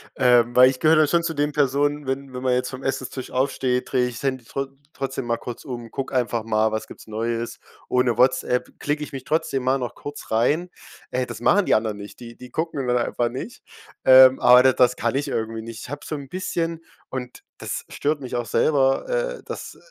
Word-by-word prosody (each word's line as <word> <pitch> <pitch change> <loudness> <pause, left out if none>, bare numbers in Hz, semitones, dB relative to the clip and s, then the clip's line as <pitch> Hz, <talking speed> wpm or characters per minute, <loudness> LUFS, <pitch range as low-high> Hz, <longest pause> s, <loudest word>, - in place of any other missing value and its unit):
Ähm, 120 -2 +4
weil 130 +1 +8
ich 130 - -4
gehöre 160 +1 +5
dann 155 -1 +5
schon 170 -1 +2
zu 165 - -2
den 145 0 0
Personen, 145 0 +1
wenn 135 0 -3
wenn 125 - -5
man 130 -1 +1
jetzt 125 0 0
vom 130 0 -8
Essenstisch 130 -1 -4
aufsteht, 130 -1 0
drehe 125 -2 +2
ich's 120 +2 -7
Handy 130 -3 -2
trot 135 +2 -4 0.2
trotzdem 135 -2 -4
mal 115 0 0
kurz 120 - -8
um, 120 -3 -7
gucke 135 0 -5
einfach 120 -2 0
mal, 110 0 +1
was 110 - -3
gibt's - - -13
Neues: 115 +2 -3 0.3
„Oh 125 - +3
ne 120 -2 +1
Whatsapp“ 125 0 +2
klicke 150 +1 -1
ich - - -8
mich 135 -2 -7
trotzdem 150 -4 0
mal 130 +1 +2
noch 120 -2 -4
kurz 145 -4 -9
rein 145 +11 +1 0.4
ey, 125 0 0
das 120 -2 -8
machen 200 +9 +4
die - - +4
anderen 110 -1 -1
nicht, 100 0 -10
die 115 -1 -10
die 125 0 -11
gucken 150 -3 -3
dann 125 - +2
einfach 120 0 0
nicht, 135 - -7 0.4
ähm, 130 0 +8
aber 125 +1 +7
da 130 -1 +5
das 125 0 +3
kann - - -1
ich 145 - -1
irgendwie 115 0 -3
nicht. 115 0 -8
Ich - - -9
habe 145 +1 -7
so 155 - -4
'n 140 -2 -8
bisschen 165 -2 -3 0.3
und 125 -1 -7
das - - -5
stört 145 0 -1
mich 125 -1 -5
auch 120 -1 -1
selber, 135 +2 +2
äh, - - -2
dass, - - -7
130 Hz, 225 wpm, -23 LUFS, 120-145 Hz, 0.4 s, weil